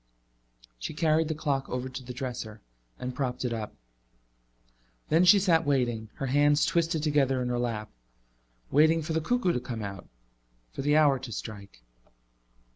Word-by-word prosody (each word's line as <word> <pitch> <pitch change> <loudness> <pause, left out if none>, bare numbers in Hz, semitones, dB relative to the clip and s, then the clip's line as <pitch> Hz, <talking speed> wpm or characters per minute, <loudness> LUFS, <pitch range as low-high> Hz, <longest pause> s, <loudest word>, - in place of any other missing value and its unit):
She - - -5
carried 155 0 +2
the 160 - -2
clock 140 -3 -2
over 125 +1 -3
to 130 +1 -7
the 125 - -8
dresser 120 -4 -5 0.4
and 125 0 -5
propped 125 -1 -3
it 120 - -1
up. 110 -8 -5 1.3
Then 165 +3 +4
she 180 +3 +8
sat 175 -4 +3
waiting, 120 -6 0
her 135 - -4
hands 145 +3 +3
twisted 165 -2 0
together 140 -4 +2
in 125 0 -2
her 120 0 -1
lap 115 -3 -3 0.8
waiting 160 +3 +4
for 160 +1 -3
the 160 - +1
cuckoo 215 -1 +1
to - - 0
come 115 -3 -6
out, 100 -2 -7 0.6
for - - -5
the 145 +2 +3
hour 145 -4 +4
to 125 -2 -8
strike. 100 - -8
135 Hz, 165 wpm, -28 LUFS, 120-155 Hz, 1.3 s, she